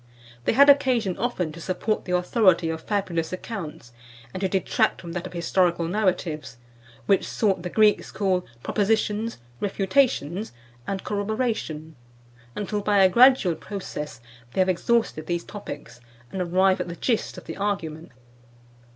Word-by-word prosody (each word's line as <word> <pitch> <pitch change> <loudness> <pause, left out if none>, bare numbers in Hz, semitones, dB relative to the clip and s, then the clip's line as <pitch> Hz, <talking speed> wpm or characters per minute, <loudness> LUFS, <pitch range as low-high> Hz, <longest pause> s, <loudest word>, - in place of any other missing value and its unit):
They - - +2
had 280 +1 +7
occasion 255 -9 +4
often 190 -8 -1
to 165 +2 -10
support 190 +5 -1
the 180 - -3
authority 180 -3 +3
of 160 0 -5
fabulous 175 -5 -2
accounts, 175 - -7 0.4
and 185 - -5
to 190 - +1
detract 190 0 +1
from 170 - -8
that 175 +1 -4
of 180 - -13
historical 175 0 +1
narratives, 175 - -1 0.5
which 195 - +2
sort 195 -5 +1
the 180 - -4
Greeks 215 +2 +3
call 190 -2 0 0.2
"Propositions," 215 +1 0 0.2
"Refutations" 200 - 0 0.3
and 195 -1 -3
"Corroboration," 205 -7 -2 0.6
until 210 0 -2
by 205 0 +2
a 190 -1 +6
gradual 245 -4 +6
process 155 - -6 0.3
they - - +3
have 185 - +2
exhausted 185 -4 0
these 170 -1 -1
topics, 145 - -9 0.3
and 190 - -3
arrive 185 +2 +3
at - - -3
the 170 - -6
gist 230 +4 -1
of - - -9
the - - -7
argument. 170 -6 -3
190 Hz, 145 wpm, -25 LUFS, 170-210 Hz, 0.6 s, had